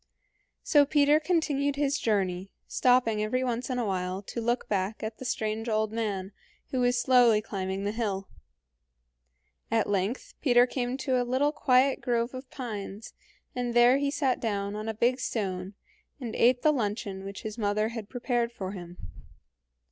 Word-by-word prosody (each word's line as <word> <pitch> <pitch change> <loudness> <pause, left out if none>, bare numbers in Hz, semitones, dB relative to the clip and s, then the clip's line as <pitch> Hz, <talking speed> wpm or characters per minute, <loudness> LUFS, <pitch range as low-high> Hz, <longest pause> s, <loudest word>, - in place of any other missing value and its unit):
So 290 -1 +5
Peter 290 +1 +4
continued 295 -4 0
his 285 0 0
journey, 190 -3 0 0.2
stopping 245 -4 +3
every 255 +5 0
once 245 0 -2
in 255 - -1
a 240 - 0
while 185 0 -2
to 235 - -5
look 240 +2 -1
back 200 +2 -2
at 220 0 -5
the 260 - -7
strange 220 0 -2
old 215 -1 +1
man, 205 -4 -2 0.4
who 260 - 0
was 245 0 +2
slowly 245 -4 +5
climbing 195 -2 -4
the 205 - 0
hill. 205 -4 -2 1.4
At 225 -1 +1
length 205 - -2
Peter 245 -3 +5
came 250 0 -2
to 260 -2 +1
a - - +1
little 260 +4 +1
quiet 260 -2 +3
grove 240 0 0
of 255 0 -8
pines, 215 -4 -6 0.4
and 245 -1 -2
there 240 +3 +6
he 285 0 +1
sat 275 -3 0
down 200 -2 -2
on 215 +1 -4
a 220 - -3
big 245 +4 +2
stone 190 -5 -3 0.4
and 235 -5 -5
ate 245 +1 +3
the 305 - +6
luncheon 205 -5 -3
which 195 0 -7
his 220 +1 -6
mother 215 +1 +1
had 225 -3 -7
prepared 240 -2 -1
for 195 -5 -5
him. 175 -2 -9
235 Hz, 170 wpm, -28 LUFS, 205-255 Hz, 1.4 s, there